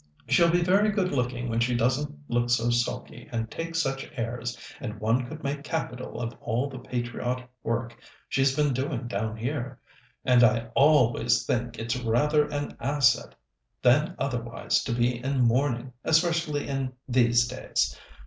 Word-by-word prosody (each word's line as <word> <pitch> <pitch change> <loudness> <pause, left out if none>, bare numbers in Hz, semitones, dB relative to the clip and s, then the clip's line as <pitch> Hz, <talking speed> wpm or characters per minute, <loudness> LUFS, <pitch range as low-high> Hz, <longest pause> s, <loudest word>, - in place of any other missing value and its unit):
She'll 170 -1 +5
be 175 +1 +3
very 200 +4 +4
good 195 -3 0
looking 125 -2 -1
when 115 0 -1
she 120 +1 +1
doesn't 130 +5 +1 0.2
look 120 0 0
so 120 0 +2
sulky 120 0 -2
and 115 -1 -3
take 165 0 -5
such 135 -4 -1
airs, 120 0 -3 0.2
and 110 -4 -6
one 115 +4 +1
could 155 +2 -9
make 140 +1 -3
capital 135 -5 -4
of 115 -1 -3
all 120 +5 -1
the 135 -2 -8
patriotic 125 +1 -3
work 115 +1 -2 0.3
she's 135 0 +2
been 145 -2 +2
doing 130 -1 -2
down 110 +1 -3
here. 125 +1 -4 0.5
And 125 -1 +5
I 115 0 +3
always 125 -5 +4
think 120 -1 -1
it's 115 +2 -2
rather 145 +6 +2
an 145 -1 -4
asset 130 -3 +2 0.5
than 150 +8 +4
otherwise 120 -4 -1
to - - -2
be 120 +1 0
in 135 0 0
mourning, 125 +1 +1
especially 160 -2 +1
in 135 -2 -2
these 120 -1 +4
days. 130 +1 -1
125 Hz, 160 wpm, -27 LUFS, 120-145 Hz, 0.5 s, She'll